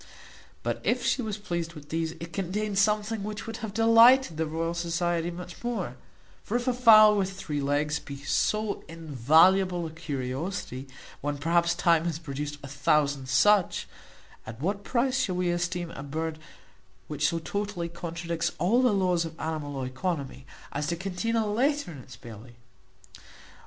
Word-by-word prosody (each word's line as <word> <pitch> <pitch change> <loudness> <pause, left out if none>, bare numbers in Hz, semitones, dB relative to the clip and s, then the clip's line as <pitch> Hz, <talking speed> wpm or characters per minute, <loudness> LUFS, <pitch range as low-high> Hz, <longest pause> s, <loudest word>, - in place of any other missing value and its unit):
But, - - -2
if - - 0
she - - +2
was 215 -3 -3
pleased 170 -5 -4
with 150 -1 -12
these, 160 0 -2
it 170 0 -9
contained 200 +2 -1
something 210 +1 +1
which 210 +1 -5
would 225 - -6
have 220 -3 -5
delighted 230 0 +6
the 160 0 0
Royal 165 +2 -2
Society 170 0 -1
much 180 +3 -9
more; 210 - -3 0.5
for 230 - -1
if 245 - -5
a 255 - +3
fowl 215 -3 +7
with 195 -2 0
three 150 -6 -4
legs 145 +2 0
be 140 -1 -9
so 210 +9 0
invaluable 165 +4 +3
a 160 - -6
curiosity, 140 -2 -4 0.3
when 145 0 -2
perhaps 170 +3 +2
time 170 -1 +3
hath 165 -1 -3
produced 145 0 -5
a - - -6
thousand 140 -1 +1
such, 195 +9 +3 0.6
at 110 +1 -8
what 200 +7 -2
price 255 +3 +1
shall 195 -8 0
we 180 -1 +1
esteem 175 0 -2
a - - -8
bird 155 +3 -4 0.7
which 150 0 0
so 170 - 0
totally 200 +1 -3
contradicts 170 0 -3
all 205 +10 +3
the 250 -4 +3
laws 180 -3 +2
of 165 -1 -8
animal 155 -3 -4
oeconomy, 135 -1 -4 0.3
as 145 +1 -2
to 170 - 0
contain 195 +5 -2
a 225 -1 +2
letter 260 +2 0
in 145 - -9
its 125 0 -12
belly? 115 +1 -12
170 Hz, 165 wpm, -27 LUFS, 150-205 Hz, 0.7 s, fowl